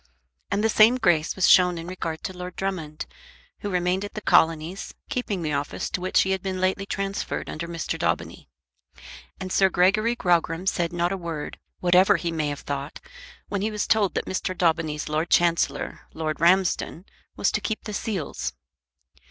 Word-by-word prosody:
And 200 Hz, +2 st, 0 dB
the -, -, +5 dB
same 220 Hz, +2 st, +6 dB
grace 175 Hz, -9 st, +2 dB
was 190 Hz, -, +3 dB
shown 180 Hz, -1 st, +6 dB
in 165 Hz, -, -6 dB
regard 170 Hz, -3 st, -5 dB
to 190 Hz, -, -5 dB
Lord 180 Hz, 0 st, -7 dB
Drummond, 170 Hz, -6 st, -4 dB, 0.5 s
who 205 Hz, -, -4 dB
remained 180 Hz, +1 st, 0 dB
at 205 Hz, -, -7 dB
the -, -, -2 dB
Colonies, 165 Hz, +3 st, +2 dB, 0.2 s
keeping 220 Hz, -10 st, -2 dB
the 155 Hz, -2 st, -1 dB
office 140 Hz, +1 st, -3 dB
to 180 Hz, -, -2 dB
which 185 Hz, -, +3 dB
he 190 Hz, -, -1 dB
had 190 Hz, -1 st, 0 dB
been 190 Hz, -1 st, -3 dB
lately 190 Hz, +2 st, 0 dB
transferred 195 Hz, -1 st, -3 dB
under 170 Hz, +2 st, -5 dB
Mr. 170 Hz, -1 st, -4 dB
Daubeny. -, -, -2 dB, 0.9 s
And 185 Hz, -1 st, -5 dB
Sir 190 Hz, -1 st, +5 dB
Gregory 200 Hz, +6 st, +3 dB
Grogram 175 Hz, -3 st, +1 dB
said 175 Hz, -3 st, 0 dB
not 175 Hz, 0 st, 0 dB
a 195 Hz, -, -1 dB
word, 165 Hz, -4 st, -5 dB, 0.2 s
whatever 180 Hz, +1 st, +5 dB
he 170 Hz, -, -2 dB
may 155 Hz, -2 st, -1 dB
have 145 Hz, -1 st, -4 dB
thought, 140 Hz, +1 st, -5 dB, 0.5 s
when 200 Hz, -1 st, -2 dB
he 215 Hz, -, 0 dB
was 210 Hz, -1 st, -2 dB
told 205 Hz, -5 st, +2 dB
that -, -, -1 dB
Mr. 185 Hz, -1 st, -3 dB
Daubeny's 160 Hz, -3 st, 0 dB
Lord 155 Hz, +3 st, -1 dB
Chancellor, 170 Hz, -1 st, +2 dB, 0.2 s
Lord 155 Hz, -1 st, -2 dB
Ramsden, 180 Hz, 0 st, +2 dB, 0.3 s
was -, -, +1 dB
to -, -, -1 dB
keep 220 Hz, -, -3 dB
the 210 Hz, -, -6 dB
seals. 200 Hz, -6 st, -3 dB
180 Hz, 180 wpm, -25 LUFS, 165-195 Hz, 0.9 s, same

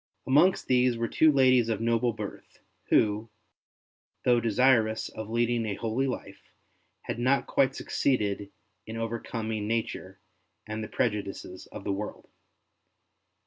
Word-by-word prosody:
Amongst 150 Hz, +8 st, +4 dB
these 125 Hz, -1 st, +3 dB
were 115 Hz, 0 st, -1 dB
two 155 Hz, +5 st, +4 dB
ladies 130 Hz, -4 st, +4 dB
of 110 Hz, -, 0 dB
noble 115 Hz, +1 st, +1 dB
birth, 105 Hz, -3 st, -8 dB, 0.3 s
who, 105 Hz, +1 st, +2 dB, 1.0 s
though 120 Hz, -1 st, +5 dB
desirous 115 Hz, -1 st, +2 dB
of 110 Hz, -1 st, -7 dB
leading 120 Hz, 0 st, +1 dB
a 100 Hz, -, -2 dB
holy 115 Hz, +5 st, -1 dB
life, 130 Hz, -, -6 dB, 0.6 s
had -, -, -4 dB
not 130 Hz, +3 st, +2 dB
quite 135 Hz, -1 st, +2 dB
succeeded 105 Hz, -7 st, -1 dB, 0.4 s
in 110 Hz, +1 st, -6 dB
over 115 Hz, +1 st, -2 dB
coming 110 Hz, -3 st, -4 dB
nature 110 Hz, -4 st, -3 dB, 0.5 s
and 110 Hz, 0 st, -4 dB
the -, -, -5 dB
prejudices 100 Hz, -3 st, -3 dB
of 100 Hz, -, -9 dB
the 100 Hz, -, -1 dB
world. 105 Hz, +2 st, -6 dB
115 Hz, 135 wpm, -28 LUFS, 105-125 Hz, 1.0 s, though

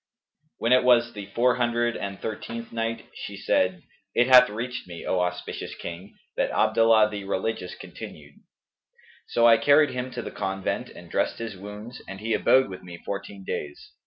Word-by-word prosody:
When 115 Hz, +2 st, +2 dB
it 130 Hz, -, +5 dB
was 120 Hz, -1 st, +4 dB
the 100 Hz, -2 st, -7 dB
Four 120 Hz, +4 st, +2 dB
Hundred 120 Hz, -1 st, +1 dB
and 100 Hz, -1 st, -5 dB
Thirteenth 115 Hz, +1 st, -6 dB
Night, 115 Hz, 0 st, -3 dB
She 100 Hz, -, -7 dB
said, 95 Hz, -2 st, +1 dB, 0.3 s
It 120 Hz, -, +5 dB
hath 125 Hz, -1 st, +8 dB
reached 120 Hz, +3 st, -5 dB
me, 85 Hz, -1 st, -8 dB
O 95 Hz, -, +1 dB
auspicious 90 Hz, 0 st, -3 dB
King, 85 Hz, +4 st, -8 dB, 0.2 s
that -, -, +1 dB
Abdallah 115 Hz, -1 st, +4 dB
the 100 Hz, -1 st, -5 dB
Religious 95 Hz, -1 st, -2 dB
continued: -, -, -10 dB, 0.9 s
"So 115 Hz, -, +2 dB
I 115 Hz, -1 st, +8 dB
carried 145 Hz, +3 st, +5 dB
him 125 Hz, 0 st, -3 dB
to 120 Hz, -, -4 dB
the -, -, -6 dB
convent 95 Hz, +1 st, -3 dB
and -, -, -12 dB
dressed -, -, 0 dB
his 115 Hz, -3 st, -5 dB
wounds, 105 Hz, +5 st, -9 dB
and 95 Hz, 0 st, -7 dB
he 110 Hz, +2 st, -1 dB
abode 130 Hz, +4 st, +4 dB
with 95 Hz, -2 st, -8 dB
me 90 Hz, -1 st, -10 dB
fourteen 100 Hz, +1 st, -6 dB
days. 75 Hz, -5 st, -6 dB
110 Hz, 175 wpm, -26 LUFS, 95-120 Hz, 0.9 s, hath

